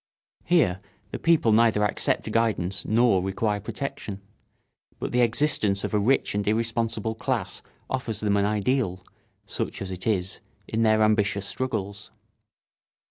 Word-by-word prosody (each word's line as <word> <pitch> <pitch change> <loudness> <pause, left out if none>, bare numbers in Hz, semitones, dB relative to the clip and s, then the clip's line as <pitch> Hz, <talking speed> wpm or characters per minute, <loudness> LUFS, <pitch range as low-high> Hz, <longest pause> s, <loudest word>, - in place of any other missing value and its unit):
Here 145 - +3 0.3
the - - -4
people 160 -9 +3
neither 110 -1 +4
accept 105 - 0
guidance 100 -5 0
nor 115 -3 +3
require 105 +2 -1
protection; 105 -2 -5 0.8
but - - -4
the 125 - +2
existence 115 -5 +1
of - - -3
a 105 - +3
rich 120 +7 +2
and 100 0 -2
irresponsible 115 0 0
class 110 - -2 0.3
offers 125 -4 -2
them 105 -1 +1
an 100 0 +2
ideal, 105 -3 0 0.4
such - - -4
as 95 -1 -5
it 95 +2 -6
is, 95 -4 0 0.3
in 110 - -1
their 110 -1 +4
ambitious 105 -2 +2
struggles. 105 -6 -4
110 Hz, 135 wpm, -25 LUFS, 100-115 Hz, 0.8 s, neither